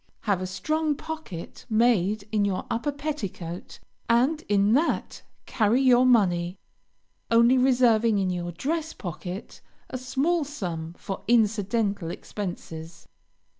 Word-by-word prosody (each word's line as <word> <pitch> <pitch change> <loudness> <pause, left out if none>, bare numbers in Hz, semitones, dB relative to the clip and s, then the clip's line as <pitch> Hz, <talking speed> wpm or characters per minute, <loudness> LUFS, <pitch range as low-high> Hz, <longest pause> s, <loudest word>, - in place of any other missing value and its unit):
Have 200 -4 0
a 185 - -2
strong 305 +12 -1
pocket 315 - -8
made 215 -3 +2
in 210 -2 +2
your 195 -2 -1
upper 235 +6 0
petticoat, 225 - -5 0.3
and 260 +7 +3
in 205 +1 +3
that 305 +7 0 0.2
carry 225 +2 +2
your 255 -1 +5
money, 180 -6 +3 0.7
only 235 +2 +5
reserving 240 -4 +4
in 190 -2 +1
your 175 -1 -3
dress 315 - -2
pocket 180 +2 -7 0.3
a 255 - -3
small 280 +6 0
sum 175 - -5
for 195 - -5
incidental 210 -4 +1
expenses. 170 -3 -7
220 Hz, 120 wpm, -26 LUFS, 185-255 Hz, 0.7 s, your